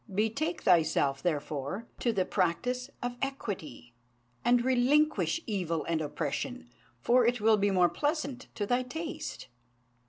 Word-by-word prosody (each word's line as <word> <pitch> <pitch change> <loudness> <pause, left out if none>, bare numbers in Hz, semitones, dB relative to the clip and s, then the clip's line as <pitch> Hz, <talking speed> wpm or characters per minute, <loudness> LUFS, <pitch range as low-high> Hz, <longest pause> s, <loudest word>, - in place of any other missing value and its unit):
Betake 225 - -1
thyself, 160 -6 +3
therefore, 150 +4 -2
to 240 - +1
the 190 -4 0
practice 245 +8 0
of 245 0 -3
equity, 185 - -5 0.5
and 240 0 +3
relinquish 285 +6 +3
evil 175 -7 -1
and 165 -1 0
oppression; 240 - -4 0.3
for 245 +1 +4
it 245 0 +1
will 220 +1 +5
be 205 0 +2
more 180 -2 +4
pleasant 290 - -2
to 205 - -1
thy 245 +4 +2
taste." 310 +4 -6
225 Hz, 130 wpm, -30 LUFS, 175-255 Hz, 0.5 s, will